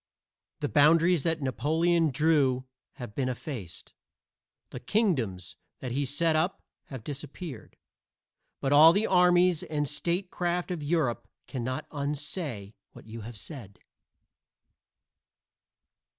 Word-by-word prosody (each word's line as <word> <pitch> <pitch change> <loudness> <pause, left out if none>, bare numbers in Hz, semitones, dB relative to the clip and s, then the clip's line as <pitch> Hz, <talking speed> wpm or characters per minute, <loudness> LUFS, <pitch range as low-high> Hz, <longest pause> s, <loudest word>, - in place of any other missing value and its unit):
The - - 0
boundaries 165 - +4
that 160 0 -1
Napoleon 160 +5 +1
drew 140 -3 +2 0.3
have 120 -4 -9
been 130 +1 -1
effaced; 120 - -7 0.8
the - - -6
kingdoms 120 - -1 0.2
that 125 - -5
he 140 +3 0
set 155 +4 +1
up 165 +5 0 0.2
have 130 -5 -9
disappeared. 145 -1 -8 0.8
But 135 +1 +1
all 155 +3 +9
the 205 +4 +2
armies 180 -2 +4
and 150 -2 -2
statecraft 175 +3 -2
of 175 -3 -3
Europe 145 -5 0 0.2
cannot 130 +3 -4
unsay 145 - -4 0.2
what - - -14
you 110 +1 -8
have 110 +1 -9
said. 115 - -8
150 Hz, 110 wpm, -28 LUFS, 130-170 Hz, 0.8 s, all